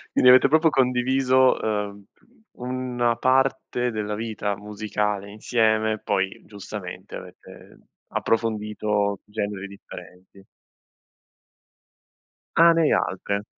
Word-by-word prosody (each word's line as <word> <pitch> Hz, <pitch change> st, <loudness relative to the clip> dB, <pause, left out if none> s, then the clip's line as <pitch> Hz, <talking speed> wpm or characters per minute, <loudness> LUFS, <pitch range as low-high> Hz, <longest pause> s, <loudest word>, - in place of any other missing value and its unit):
Quindi 125 Hz, -, +6 dB
avete 130 Hz, +2 st, +7 dB
proprio 160 Hz, +3 st, +4 dB
condiviso, 130 Hz, 0 st, +2 dB
ehm, 105 Hz, -2 st, -3 dB, 0.5 s
u 125 Hz, -, -12 dB
una 125 Hz, -2 st, -1 dB
parte 130 Hz, 0 st, +1 dB
della 105 Hz, -2 st, -3 dB
vita 105 Hz, -2 st, -3 dB
musicale 105 Hz, -1 st, -3 dB
insieme, 110 Hz, 0 st, +1 dB
poi 95 Hz, -2 st, -2 dB
giustamente 100 Hz, -2 st, -8 dB
avete -, -, -13 dB, 0.3 s
approfondito 105 Hz, -2 st, -1 dB
generi 105 Hz, -2 st, -4 dB
differenti. 95 Hz, -1 st, -13 dB, 2.1 s
Ah, 170 Hz, +1 st, +7 dB
ne 165 Hz, -, +2 dB
hai 150 Hz, -, +3 dB
altre. 100 Hz, +2 st, -1 dB
110 Hz, 95 wpm, -24 LUFS, 100-125 Hz, 2.1 s, avete